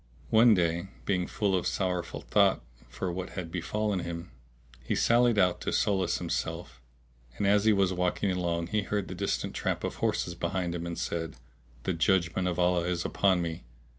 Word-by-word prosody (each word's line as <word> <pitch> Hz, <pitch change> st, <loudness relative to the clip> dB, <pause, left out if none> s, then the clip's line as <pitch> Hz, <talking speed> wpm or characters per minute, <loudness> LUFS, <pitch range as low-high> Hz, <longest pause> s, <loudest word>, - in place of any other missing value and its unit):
One 115 Hz, 0 st, +7 dB
day, 85 Hz, 0 st, 0 dB, 0.2 s
being 90 Hz, -3 st, 0 dB
full 100 Hz, -3 st, 0 dB
of 90 Hz, -, 0 dB
sorrowful 90 Hz, -2 st, -2 dB
thought -, -, +3 dB, 0.3 s
for 65 Hz, +9 st, -3 dB
what 90 Hz, +1 st, -5 dB
had 90 Hz, -3 st, -5 dB
befallen 100 Hz, +3 st, -1 dB
him, 85 Hz, 0 st, -6 dB, 0.5 s
he -, -, -1 dB
sallied 120 Hz, -1 st, +4 dB
out 90 Hz, -3 st, +3 dB
to -, -, -2 dB
solace 95 Hz, -3 st, +1 dB
himself; 60 Hz, -, -4 dB, 0.6 s
and, 100 Hz, -, 0 dB
as 100 Hz, +1 st, +4 dB
he 110 Hz, -, +6 dB
was 100 Hz, -2 st, +2 dB
walking 90 Hz, +2 st, 0 dB
along, 85 Hz, -2 st, -1 dB
he 105 Hz, 0 st, +1 dB
heard 100 Hz, 0 st, -2 dB
the -, -, -4 dB
distant -, -, -2 dB
tramp -, -, -2 dB
of -, -, -3 dB
horses 85 Hz, -, 0 dB
behind 85 Hz, +1 st, -2 dB
him 85 Hz, 0 st, -4 dB
and 85 Hz, -, -5 dB
said, 80 Hz, -1 st, -3 dB, 0.5 s
"The 95 Hz, -, 0 dB
judgement 85 Hz, +1 st, +1 dB
of 90 Hz, -, -1 dB
Allah 90 Hz, -1 st, +2 dB
is 90 Hz, -1 st, -1 dB
upon 95 Hz, -3 st, +2 dB
me!" 80 Hz, -4 st, -5 dB
90 Hz, 180 wpm, -29 LUFS, 85-100 Hz, 0.6 s, One